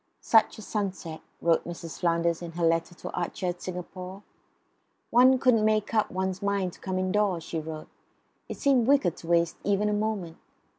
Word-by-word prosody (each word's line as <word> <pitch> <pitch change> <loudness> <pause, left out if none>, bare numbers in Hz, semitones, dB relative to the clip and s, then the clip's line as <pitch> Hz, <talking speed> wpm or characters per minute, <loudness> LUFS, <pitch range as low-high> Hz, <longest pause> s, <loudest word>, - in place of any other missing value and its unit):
"Such 225 -1 +4
a 215 - -9
sunset," 190 -6 -4 0.2
wrote 170 -1 +3
Mrs. 170 -1 -7
Flanders 170 -1 +1
in 170 -1 -7
her 170 0 0
letter 165 +1 +1
to - - -7
Archer 180 +1 -3
at 175 0 -5
Singapore. 185 +2 -7 0.9
"One 255 +2 +6
couldn't 245 -4 +3
make 215 0 +1
up 215 -2 +2
one's 190 0 -2
mind 200 -3 0
to - - -16
come 190 -1 -3
indoors," 185 -2 +1
she 165 - -4
wrote. 155 0 -7 0.6
"It - - -5
seemed 265 -5 +3
wicked 265 - +3
to 165 - -11
waste 170 0 +2
even 205 +1 +1
a - - 0
moment." 205 -6 -2
185 Hz, 180 wpm, -27 LUFS, 170-210 Hz, 0.9 s, One